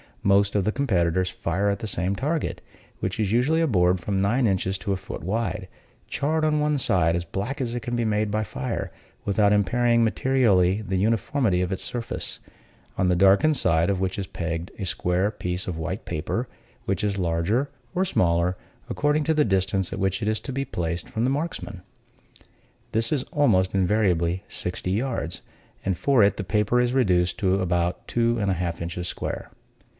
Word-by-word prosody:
Most 100 +1 +3
of 100 - +2
the 110 - +2
competitors 95 -9 +1
fire 95 +2 -1
at 100 -1 0
the 110 - -4
same 95 -1 0
target; 150 +7 -2 0.4
which 95 +2 -3
is 105 -3 +1
usually 130 +8 +3
a 165 - +3
board 90 -6 +3
from 95 +2 -1
nine 120 +6 +2
inches 95 -1 0
to 100 +2 -1
a - - -1
foot 95 -4 -8
wide, 105 0 -2 0.4
charred 155 +2 0
on 150 -1 +2
one 150 0 +1
side 85 -8 +3
as 85 0 -2
black 100 +10 -4
as 120 -2 -2
it 120 - -2
can 120 +2 -3
be 120 -1 0
made 105 0 +1
by 105 +1 0
fire, 65 -10 -4 0.3
without 100 +1 +3
impairing 115 +4 +3
materially 110 -6 +3
the 95 -2 -1
uniformity 110 0 +1
of 90 +1 -1
its 95 - -3
surface; 120 -2 -4 0.6
on 90 - +3
the 90 - +3
darkened 100 - +5
side 85 -3 +2
of 100 -2 0
which 95 0 -1
is 95 - -3
pegged 85 0 -4
a 100 - -4
square 90 +2 0
piece 90 -3 -4
of 90 -3 -3
white 90 +6 -4
paper, 75 -3 -2 0.4
which 100 +2 -1
is 100 -1 0
larger 90 +10 0 0.3
or 185 +1 +2
smaller, 85 - +2 0.3
according 150 +1 +1
to 160 - +2
the 150 -1 +3
distance 95 -1 0
at 95 - -4
which 95 +2 0
it 105 - -1
is 110 0 +1
to 135 - -6
be 135 +1 -1
placed 85 -4 -3
from 110 - -2
the 130 - +2
marksmen. 145 - -4 1.1
This 115 +1 +1
is 140 -4 +1
almost 105 -11 +2
invariably 95 -2 +1
sixty 90 +1 -3
yards, 110 -5 -2 0.4
and 95 -2 0
for 135 -1 +4
it 100 - +3
the 100 - -2
paper 105 +5 +1
is 125 0 +2
reduced 90 -9 +2
to 95 -3 +2
about 90 -1 -1
two 120 0 +1
and 100 -2 0
a - - +3
half 85 -1 -3
inches 90 +1 -4
square. - - -4
100 Hz, 190 wpm, -25 LUFS, 90-120 Hz, 1.1 s, darkened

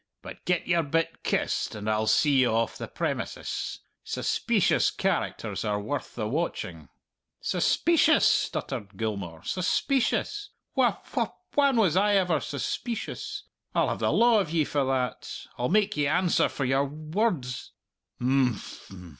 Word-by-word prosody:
But - - -10
get 180 -1 +1
your 170 -2 +3
bit 165 +2 -1
kist, - - -1
and 105 0 -6
I'll 110 0 +1
see 140 +6 +4
ye 130 - +5
off 115 0 0
the - - -6
premises. - - -3 0.2
Suspeecious - - +1
characters - - -2
are 105 -1 0
worth 140 +7 -4
the 110 -3 -2
watching." 90 - -3 0.5
"Suspeecious!" 320 -1 +3
stuttered 105 -7 0
Gilmour, 100 -7 -4
"suspeecious! 275 - 0 0.3
Wh - - +4 0.2
wh - - +2 0.3
whan 280 -3 +3
was 190 -8 +3
I 205 +2 +4
ever 180 -5 +3
suspeecious? 245 - -4 0.3
I'll - - +3
have - - -2
the - - +1
law 235 -1 +5
of 190 - -1
ye 160 -1 +2
for 145 -1 0
that. 130 -1 -1 0.3
I'll 125 - 0
make 210 +1 +2
ye 145 -1 +1
answer 175 +3 +2
for 135 - -3
your 135 +2 +2
wor 155 +10 0
rds." 125 -5 -6 0.5
"Imphm!" 120 -8 -1
145 Hz, 145 wpm, -27 LUFS, -, 0.5 s, ye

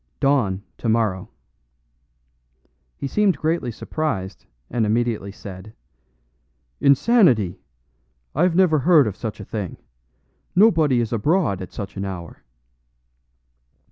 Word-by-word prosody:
"Dawn, 115 -9 +1 0.2
tomorrow." 110 -3 0 1.7
He - - -5
seemed 195 +3 +2
greatly 160 -4 -1
surprised, 110 -6 -4 0.2
and 115 - -1
immediately 110 -2 0
said: 100 +1 -10 1.1
"Insanity! 140 - +3 0.7
I 175 +5 +3
never 175 -3 +3
heard 155 -1 +5
of 105 -3 -3
such 110 -1 -6
a 100 - -8
thing. 100 -4 -5 0.8
Nobody 160 - +4
is 115 0 -3
abroad 115 - +1
at 95 - -8
such 100 -2 -7
an 100 - -3
hour." 90 -4 -8
115 Hz, 105 wpm, -22 LUFS, 100-155 Hz, 1.7 s, heard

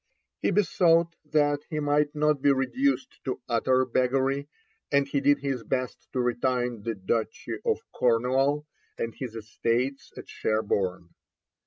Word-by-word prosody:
He - - +1
besought 170 -4 +3
that 145 -1 +2
he 155 - -2
might 145 0 +1
not 150 -2 +2
be 140 - +5
reduced 255 - 0
to 130 - -3
utter 130 +2 +2
beggary, 135 +3 +1 0.4
and 140 -1 +3
he 140 0 0
did 145 +1 +4
his 135 -3 -2
best 130 0 -3
to 125 - +1
retain 125 -1 0
the 115 +1 -3
Duchy 105 +4 -2
of 450 -2 0
Cornwall 130 +5 +2 0.3
and 115 0 -3
his 125 -4 -6
estates 115 +4 -2
at - - -9
Sherborne. 95 -5 -1
135 Hz, 140 wpm, -27 LUFS, 120-145 Hz, 0.4 s, be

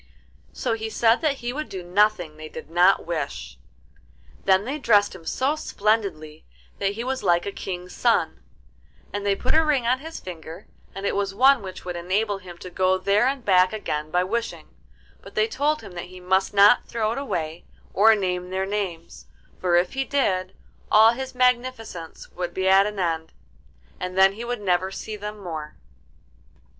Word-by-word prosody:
So - - -2
he 220 0 -3
said 230 +1 +3
that 305 -3 +2
he 245 - -1
would 305 +2 -5
do 185 -2 -6
nothing 185 -2 +2
that 155 - -21
they 155 0 -9
did 155 - -10
not 180 +3 +4
wish. 140 - -4 0.9
Then 190 +1 +4
they 280 +5 -3
dressed 205 -5 +3
him 180 -3 -12
so 270 +4 0
splendidly 200 - -1 0.4
that 200 0 0
he 230 +3 -5
was 260 +1 -2
like 175 -3 +2
a 200 - -3
King's 180 -2 -6
son; - - +1 0.7
and 205 0 -3
they 200 -1 +2
put 250 - -1
a 320 - +5
ring 290 -6 +1
on 255 +2 +2
his 320 +3 -8
finger, 170 +1 -9 0.3
and 195 +1 -5
it - - 0
was 195 -1 -1
one 265 +2 +5
which 185 -2 -9
would 180 -1 -4
enable 195 +4 -1
him 180 -2 -11
to 180 +1 -10
go 185 +1 +2
there 200 +5 +2
and 270 -2 -2
back 185 0 +4
again 155 -8 -3
by 180 +3 +2
wishing, 230 +5 -4 0.5
but - - -14
they 445 -1 +3
told 305 -7 0
him - - -10
that 175 -1 -6
he 185 +1 -12
must 190 +1 +1
not 205 +3 +5
throw 220 -2 -1
it 235 - -3
away, 165 - -4 0.3
or 220 +2 +6
name 180 -3 -2
their 190 +1 -1
names; 195 -5 -5 0.3
for 180 -2 +2
if 175 +1 +2
he 270 - 0
did, 190 -10 0 0.4
all 220 +1 +7
his 260 +2 -6
magnificence 250 -8 -1
would 180 0 -5
be 190 0 0
at 195 +1 +6
an 210 -1 -6
end, 165 -3 -2 0.7
and 180 0 -5
then 190 0 +6
he 225 +4 -7
would 240 -2 -4
never 185 -1 +1
see 215 +2 -6
them 210 +1 -6
more. 160 -6 -7
195 Hz, 190 wpm, -24 LUFS, 180-230 Hz, 0.9 s, all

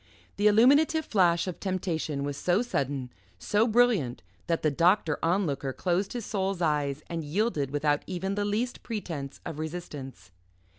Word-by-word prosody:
The 205 +1 +4
illuminative 285 +9 +5
flash 175 -5 +3
of 185 -3 -5
temptation 165 -6 -2
was 145 0 -3
so 180 - +1
sudden, 140 - -2 0.3
so 210 - +1
brilliant, 220 - +2 0.2
that 165 -1 0
the 155 - +3
Doctor 170 0 +2
Onlooker 165 -6 0
closed 185 - -1
his 240 -4 -4
soul's 195 -3 -1
eyes 150 -3 0
and 165 -1 -4
yielded 155 - 0
without 145 +1 +1
even 190 +1 -2
the 205 0 -1
least 220 +5 -2
pretence 165 - -5
of 155 - -5
resistance. 145 - -7
175 Hz, 150 wpm, -28 LUFS, 145-205 Hz, 0.3 s, illuminative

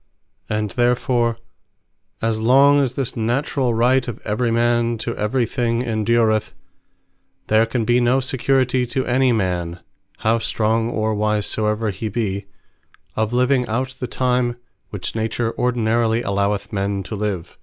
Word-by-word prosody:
And 105 -1 -1
therefore, 120 -1 +1 0.9
as 115 -1 0
long 135 +5 +5
as 130 -3 0
this 130 -2 -3
naturall 120 +1 0
Right 125 +3 +3
of 120 -3 -5
every 110 +3 0
man 120 0 +1
to 115 +1 -4
every 115 +4 0
thing 115 0 -1
endureth, 110 -1 +1 0.9
there 110 +1 +4
can 115 -1 -1
be 120 +1 +3
no 125 +2 +3
security 130 -1 +1
to 130 +2 -2
any 130 +1 +2
man, 90 -5 -1 0.4
(how 115 +1 +1
strong 115 0 0
or 110 -1 -1
wise 105 0 0
soever 105 0 -1
he 105 +3 -4
be,) 100 -3 -3 0.7
of 110 0 0
living 125 +1 +2
out 130 +4 -2
the 125 - -3
time, 125 -1 0 0.3
which 95 -2 -5
Nature 115 +1 -1
ordinarily 115 -1 +1
alloweth 100 +2 -1
men 100 0 -1
to 105 - -6
live. 100 -5 -4
115 Hz, 145 wpm, -21 LUFS, 110-125 Hz, 0.9 s, long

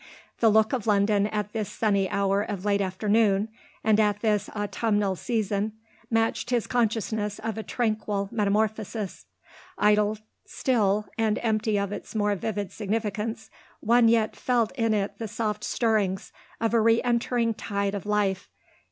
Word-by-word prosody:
The 225 - +5
look 220 +2 +3
of 240 -4 -2
London 205 0 +3
at 210 -1 -3
this 215 -3 -2
sunny 200 -3 +1
hour 200 0 +1
of 205 -2 -4
late 200 -1 +2
afternoon 205 +2 +2 0.3
and 215 -1 +3
at 210 -1 +2
this 210 -2 +1
autumnal 205 -1 0
season 210 -1 -1 0.4
matched 225 +1 0
his 240 -3 +1
consciousness 220 -3 -1
of 225 0 -4
a 220 - -3
tranquil 215 -4 -1
metamorphosis. 210 -1 -1 0.5
Idle 210 +1 +3 0.3
still 210 -5 +1
and 220 -1 +2
empty 220 -1 +1
of 200 0 -1
its 205 - -7
more 205 -1 +2
vivid 205 -1 -3
significance, 220 +1 -3 0.3
one 235 +1 +4
yet 225 -1 +2
felt 240 -3 +1
in 225 -4 +1
it 200 -1 -2
the 225 - -3
soft 210 -1 -3
stirrings 210 -5 0 0.3
of 225 0 0
a 230 - +4
re 230 +1 +4
entering 235 -1 +1
tide 200 -1 -2
of 200 0 -5
life. 200 -3 0
215 Hz, 150 wpm, -26 LUFS, 205-225 Hz, 0.5 s, The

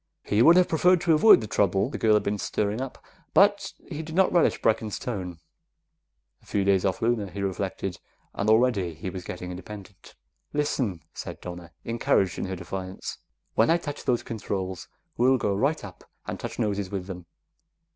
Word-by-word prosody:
He 105 +2 +2
would 165 +7 +8
have 180 0 +5
preferred 180 +3 +4
to 170 -2 +3
avoid 155 - +7
the 110 - -5
trouble 100 0 +2
the - - -5
girl 110 -1 +4
had 105 - +2
been 100 0 -1
stirring 105 +4 -1
up, 135 -1 -5 0.4
but 200 +1 +4 0.2
he 155 -3 -5
did 160 0 -7
not 190 0 +4
relish 175 - +3
Brecken's 110 -1 0
tone. 95 -8 -5 1.0
A - - -25
few 100 - 0
days 95 -1 +3
off 95 +2 -1
Luna, 115 -4 +1
he 100 +2 -5
reflected, 95 -1 -3 0.3
and 105 - -1
already 110 -7 +3
he 90 +4 -5
was 90 -1 -6
getting 90 0 -6
independent. 95 +1 -10 0.4
"Listen," 130 - -1
said - - -7
Donna, 85 -1 -8
encouraged 115 -5 +1
in - - -2
her 95 0 -4
defiance, 95 +1 -6 0.3
"when 110 - +3
I 165 - +5
touch 145 -4 -7
those 120 -2 +1
controls, 95 -4 -4 0.3
we'll 130 +2 +4
go 105 -4 0
right 140 +10 0
up 95 -4 -10 0.2
and - - -5
touch - - -6
noses 100 -4 -1
with 95 -2 -4
them. 90 -3 -8
105 Hz, 185 wpm, -26 LUFS, 95-130 Hz, 1.0 s, would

